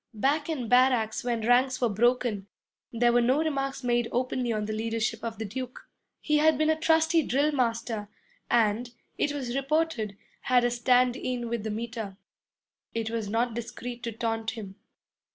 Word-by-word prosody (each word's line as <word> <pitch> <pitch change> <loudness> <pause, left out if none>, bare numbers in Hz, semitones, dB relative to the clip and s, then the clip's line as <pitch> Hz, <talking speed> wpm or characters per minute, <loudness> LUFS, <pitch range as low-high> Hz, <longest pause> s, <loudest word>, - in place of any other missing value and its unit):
Back 285 +8 +1
in 265 -7 -2
barracks 245 -1 +3
when 240 -2 -1
ranks 255 +2 +3
were 245 - +3
broken, 225 -2 +1 0.4
there 240 0 +2
were 240 - +5
no 255 +4 +3
remarks 275 -4 -1
made 240 -1 +1
openly 250 0 -1
on 215 -1 -1
the 215 - -3
leadership 225 0 -2
of 225 -2 -4
the 220 - -4
Duke. 250 +4 -7 0.3
He 300 -1 +1
had 310 -1 +4
been 310 +1 +3
a - - +2
trusty 320 +1 +3
drill 285 +2 +1
master 230 -5 -1 0.4
and, 230 +1 +2 0.3
it 290 - +1
was 260 -4 -4
reported, 275 -7 0 0.2
had 250 -1 +3
a 245 - +2
'stand 245 +1 +3
in' 250 -2 -3
with 235 -1 -2
the 220 - -4
Meter. 220 -2 -5 0.8
It 225 -1 -2
was 225 -3 -3
not 230 +2 0
discreet 235 +1 -6
to 235 -1 -3
taunt 225 0 -2
him. 200 -3 -7
240 Hz, 170 wpm, -28 LUFS, 225-265 Hz, 0.8 s, were